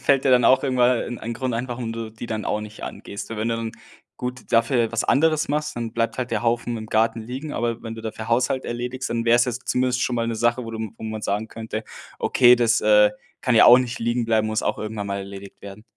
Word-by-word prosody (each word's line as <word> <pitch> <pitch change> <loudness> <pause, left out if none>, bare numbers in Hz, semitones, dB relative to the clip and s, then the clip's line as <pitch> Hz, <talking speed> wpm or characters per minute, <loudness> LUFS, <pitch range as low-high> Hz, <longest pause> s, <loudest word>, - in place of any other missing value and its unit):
fällt 140 -1 +2
dir 135 - +3
dann 125 -1 +5
auch 130 +1 +5
irgendwann 125 -2 +3
e - - -2
e - - -7
'n 120 - -5
ein 115 +1 -5
Grund 130 0 -2
ein 120 +2 -3
warum 120 -2 -4
du 115 -1 -5
die 110 +2 -8
dann 110 -1 -3
auch 105 - -1
nicht 105 0 -10
angehst? 100 - -7
W 115 - -5
wenn 110 +2 -1
du 115 - 0
dann, 115 -1 -4 0.4
gut, 125 -1 -6
dafür 115 0 +2
was 115 - +1
anderes 155 +2 +2
machst, 150 0 -2
dann 115 -1 -4
bleibt 115 +2 -1
halt 125 -2 -2
der 110 0 -1
Haufen 120 0 0
im 110 -1 -6
Garten 115 +1 +1
liegen. 130 +6 -6
Aber 115 -1 -2
wenn 115 0 -6
du 115 - -9
dafür 110 0 -6
Haushalt 130 +3 +1
erledigst, 125 +2 -4
dann 115 0 -1
wäre 120 0 +5
es 120 - +4
jetzt 125 0 -4
zumindest 125 0 +1
schon 125 - 0
mal 115 - 0
'ne 115 - -2
Sache, 120 +2 +1
wo 115 - -6
du 110 - -6 0.2
wo - - -13
man 110 -1 -5
sagen 105 +3 -2
könnte: 110 -1 -6 0.3
„Okay 125 -1 +5
das, 120 -1 +3
äh, 105 -1 +5 0.3
kann 125 - +2
ja - - +7
auch 125 +1 +9
nicht 125 0 -3
liegen 120 +1 0
bleiben, 110 -1 +2
muss 110 0 -1
auch - - -1
irgendwann 105 -1 -4
mal 100 0 -3
erledigt 100 0 -9
werden“. 100 +1 -10
115 Hz, 265 wpm, -23 LUFS, 110-125 Hz, 0.4 s, auch